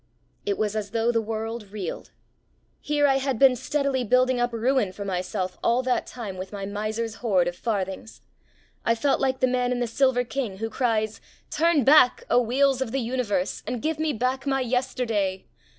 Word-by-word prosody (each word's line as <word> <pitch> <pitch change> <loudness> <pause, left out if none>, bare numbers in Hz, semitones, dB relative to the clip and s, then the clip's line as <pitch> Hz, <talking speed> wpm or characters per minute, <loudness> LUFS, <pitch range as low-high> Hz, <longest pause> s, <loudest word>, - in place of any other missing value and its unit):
It 200 - 0
was 215 -1 -1
as 210 -2 -3
though 230 +2 +1
the 230 -1 +1
world 225 0 -5
reeled. 200 -5 -5 0.7
Here 295 0 +1
I 270 -1 +4
had 270 -2 -1
been 265 +1 +6
steadily 265 +1 -1
building 255 +2 +3
up 240 0 +1
ruin 235 -2 +1
for 200 +2 -7
myself 185 0 -3
all 245 +2 +2
that 255 -1 0
time 215 -7 -7
with 185 +1 -6
my 200 -2 -5
miser's 215 +2 -3
hoard 190 -7 +2
of 175 - -3
farthings. 200 0 -4 0.6
I 230 - +2
felt 275 +5 +1
like 260 -1 0
the - - +5
man 250 0 0
in 250 - 0
The 245 - +1
Silver 245 +1 +2
King 245 -5 -4
who 225 +2 -4
cries: 220 -3 0 0.3
"Turn 325 -2 +3
back, 265 -1 +6
O 245 - +5
wheels 265 +2 +2
of 250 -4 -2
the 270 - 0
Universe, 230 -6 -1
and 250 - -2
give 310 +4 -2
me 315 -1 +1
back 255 +3 -2
my 270 -1 +1
yesterday!" 235 -6 -1
240 Hz, 190 wpm, -25 LUFS, 215-260 Hz, 0.7 s, been